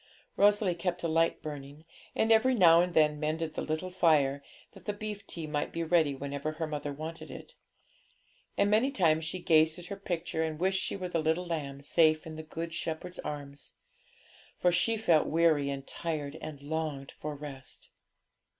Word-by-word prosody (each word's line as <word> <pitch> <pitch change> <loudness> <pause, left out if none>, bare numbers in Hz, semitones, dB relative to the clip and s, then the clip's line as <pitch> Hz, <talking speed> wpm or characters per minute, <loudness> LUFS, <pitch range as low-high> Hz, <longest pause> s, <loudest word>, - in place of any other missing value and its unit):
Rosalie 205 -2 +4
kept 175 +1 -3
a - - +1
light 165 +1 +1
burning, 145 +1 -8 0.3
and 220 - +2
every 250 +4 +5
now 170 -5 +7
and 180 0 -2
then 150 -1 +4
mended 155 +1 -2
the - - -3
little 155 +4 -3
fire, 145 -6 +3 0.3
that - - -16
the 210 - -1
beef 205 -1 -6
tea 165 -2 -5
might 150 -1 -2
be 165 - -2
ready 160 -4 +3
whenever 140 +2 -4
her 160 +1 -3
mother 150 -1 -4
wanted 155 +3 -7
it. - - -10 1.0
And 200 - +3
many 225 +6 +4
times 165 - +2
she 185 - -2
gazed 160 -3 +3
at 175 - -9
her - - -4
picture, 175 -4 -3
and 155 -1 -3
wished 190 +1 +1
she - - -2
were 185 -2 -4
the 170 -2 0
little 160 +3 0
lamb 145 -5 -4
safe 155 +2 +3
in 160 -1 -7
the 160 - -6
Good 165 +1 -6
Shepherd's 170 +2 -4
arms. 145 -1 -7 0.8
For 180 - +3
she 220 +6 +2
felt 170 -8 +3
weary 160 -3 +3
and 135 -1 -4
tired, 155 -3 -4
and 150 -3 -8
longed 150 -2 -3
for 150 0 -6
rest. 140 -2 -10
160 Hz, 185 wpm, -30 LUFS, 150-180 Hz, 1.0 s, now